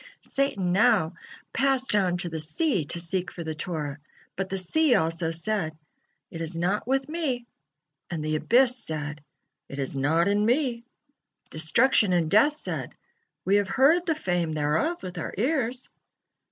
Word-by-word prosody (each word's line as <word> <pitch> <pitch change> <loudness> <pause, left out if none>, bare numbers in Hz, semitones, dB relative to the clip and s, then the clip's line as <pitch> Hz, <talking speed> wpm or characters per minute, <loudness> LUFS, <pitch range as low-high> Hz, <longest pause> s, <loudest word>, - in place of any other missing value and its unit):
'" - - -29
Satan 205 -10 -1
now 195 -4 +3 0.4
passed 265 -2 +2
on 185 -4 +2
to 175 -1 -3
the 160 -1 -4
sea 170 - 0
to 170 - -4
seek 180 +2 -1
for 170 - -7
the 160 -1 -4
Torah, 155 -3 -4 0.4
but 190 0 -3
the 195 - -2
sea 250 - +3
also 165 -2 0
said: 165 -1 -2 0.5
"It 165 - -6
is 165 +1 -4
not 190 +6 -1
with 270 +1 +1
me," 295 -7 -2 0.6
and 160 -3 -4
the 155 0 0
abyss 245 +7 +3
said: 150 -1 -5 0.5
"It 135 - -7
is 135 0 -3
not 160 +6 +2
in 205 +1 +2
me." 240 0 +1 0.7
Destruction 195 +6 +3
and 165 -3 +1
death 290 +9 +5
said: - - -5 0.5
"We 195 +2 +4
have 205 -1 +1
heard 300 - +3
the 325 - +2
fame 175 - -1
thereof 155 - 0
with 180 -1 -6
our - - -5
ears." 255 0 -1
190 Hz, 165 wpm, -26 LUFS, 160-250 Hz, 0.7 s, death